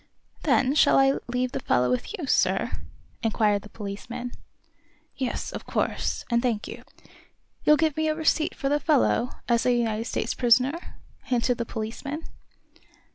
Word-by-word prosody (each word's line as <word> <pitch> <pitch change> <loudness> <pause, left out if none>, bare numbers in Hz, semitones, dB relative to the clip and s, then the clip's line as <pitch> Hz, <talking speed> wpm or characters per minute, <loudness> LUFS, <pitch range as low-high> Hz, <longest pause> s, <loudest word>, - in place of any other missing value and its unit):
"Then 265 0 +3
shall 305 - +5
I 270 0 +4
leave 250 +1 -1
the - - -3
fellow 125 0 +2
with 125 - -2
you, 335 - -4
sir?" - - +2 0.5
inquired 215 -2 +2
the 210 - -13
policeman. 230 +5 -6 0.8
"Yes, 260 -3 -3
of - - -7
course; - - -1
and 235 0 +3
thank 235 -4 -1
you." - - -8 0.8
"You'll 300 - +6
give 310 -1 +1
me 315 0 0
a 310 - +1
receipt 315 0 +1
for 275 - -2
the 290 +1 +2
fellow, 275 -4 +2 0.2
as 235 -1 +2
a 250 - +3
United 225 -1 -1
States - - -2
prisoner?" 255 +7 +2 0.3
hinted 245 -1 +1
the 235 - -1
policeman. 240 +9 -5
250 Hz, 155 wpm, -26 LUFS, 230-285 Hz, 0.8 s, You'll